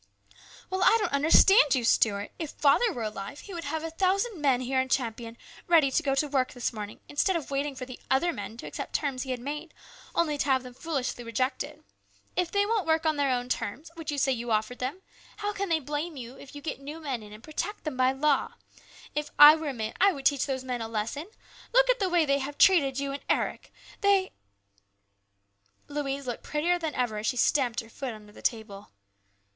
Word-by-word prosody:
" - - -21
Well, 375 0 -1
I 450 - +6
don't 430 - -1
understand 300 - +6
you, 250 - 0
Stuart. 205 -3 +2
If 320 -3 -3
father 310 +13 +3
were 240 -10 -4
alive, 210 +5 -6
he 400 - -10
would 335 -3 -5
have 315 +2 -3
a 325 - -4
thousand 385 +2 0
men 265 -4 +3
here 260 +1 +1
in 260 - -4
Champion 230 -2 -2 0.3
ready 320 -6 +5
to - - +2
go 275 -1 0
to 295 +2 +1
work 265 -3 0
this 245 -1 -2
morning, 210 -1 -7
instead 355 +6 +1
of 315 -4 -4
waiting 280 0 -1
for 255 - -6
the 255 -1 -10
other 335 +6 +2
men 225 - -7
to - - -8
accept - - -6
terms 275 -4 -1
he 265 - -5
had 255 -1 -2
made, 295 +6 -6 0.4
only 305 -4 +1
to - - +1
have 265 -2 +2
them 250 -1 -10
foolishly 270 -4 -3
rejected. 255 +4 -2 0.5
If 360 -2 0
they 405 +2 +2
won't 420 -5 0
work 320 0 +2
on 310 -1 +2
their 285 -1 +2
own 245 -1 0
terms, 250 +6 -4
which 325 -3 -5
you 290 - -3
say 270 0 +2
you 240 -1 -3
offered 220 +3 0
them, 275 +10 -4 0.3
how 415 0 -2
can 400 -1 -3
they 330 - +3
blame 295 +2 -4
you 245 0 -8
if 270 +1 -13
you 290 - -9
get 310 - -4
new 295 +4 -7
men 275 -7 -3
in 210 -1 -12
and 215 +2 -12
protect 405 +8 -4
them 305 -4 -4
by 255 0 +3
law? 280 +1 +1 0.6
If 300 0 -2
I 295 +1 +11
were 315 -2 -3
a - - -3
man, 220 -2 -3
I 395 0 +6
would 275 -2 -8
teach 285 -1 +3
those 260 -2 -2
men 250 -2 -3
a 225 - -3
lesson! 230 - -3 0.5
Look - - +6
at - - -1
the 385 -2 +1
way 345 -2 +3
they 280 -1 +2
have 280 +1 -5
treated 285 -9 +5
you 280 0 -2
and 280 - -5
Eric. - - -1 0.3
They 395 -2 +3 0.8
" 100 0 -44
Louise 280 -1 -3
looked 245 -2 -4
prettier 345 +4 0
than 320 -3 -3
ever 235 -4 -1
as 215 - -3
she 250 - 0
stamped 245 -3 +2
her 225 - -15
foot 250 -1 -5
under 210 -1 -14
the - - -13
table. 215 -3 -3
275 Hz, 230 wpm, -28 LUFS, 245-320 Hz, 0.8 s, I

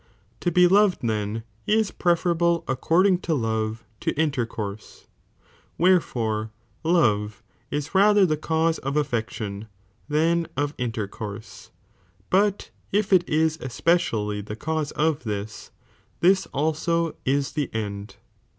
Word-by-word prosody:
To 175 - 0
be 180 +1 +5
loved 200 -2 +3
then 110 0 -2 0.2
is 215 -1 +2
preferable 170 -1 +1
' - - -36
iccording 175 +8 +2
to 160 - 0
love 110 -2 -2 0.2
to - - -1
interconrse, 115 -9 -3 0.7
wherefore 115 -12 +1 0.3
love 115 -10 +1 0.3
is 145 +3 -3
rather 205 +1 +5
the 155 -3 0
use 160 0 +2
of 135 +2 -2
affection 110 -6 -3 0.4
than 165 +2 +2
of 145 +1 0
intercourse, 110 -2 -5 0.6
but 200 +1 +2 0.2
if 205 0 +1
it 180 -1 +4
is 160 +1 +1
especially 120 -7 0
rhed«itB 105 +1 -7
i^^^ - - -24
cause) 155 -2 -2
of 155 -3 0
this, 105 -1 -5 0.5
this 190 +2 +3
also 160 +3 0
ia 140 +2 +3
the 145 -2 -1
end. 100 -2 -5
150 Hz, 125 wpm, -24 LUFS, 110-170 Hz, 0.7 s, be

